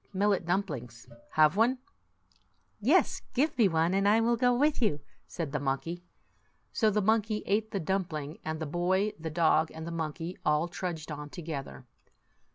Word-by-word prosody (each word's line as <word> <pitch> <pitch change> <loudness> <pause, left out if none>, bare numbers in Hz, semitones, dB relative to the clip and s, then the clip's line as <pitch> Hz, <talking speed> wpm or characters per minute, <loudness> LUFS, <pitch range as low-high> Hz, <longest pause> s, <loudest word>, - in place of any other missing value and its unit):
" - - -37
Millet 195 -2 +1
dumplings. 135 - -3 0.3
Have 155 +2 +5
one? 235 +5 +3 0.6
" - - -40
"Yes; - - +3
give 290 +5 +2
me 230 -5 +5
one, 165 0 +1
and 195 +1 +2
I 215 +2 +5
will 235 +1 +3
go 245 +1 +3
with 280 +4 +2
you," 180 -11 +1 0.3
said 165 -5 -4
the 150 - -1
monkey. 145 +5 -2 0.7
So 220 - +3
the 210 -1 +1
monkey 220 0 +1
ate 215 +2 +1
the 200 - -2
dumpling; 160 -4 -3
and 155 0 -3
the 160 - -3
boy, 185 +6 +1
the 160 0 -4
dog, 160 0 +3
and 160 0 -7
the 170 - -5
mon 160 -2 -2
key 170 +3 -7
all 150 +2 +2
trudged 170 -3 -5
on 150 0 -6
together. 145 -6 -7
175 Hz, 180 wpm, -30 LUFS, 155-210 Hz, 0.7 s, Have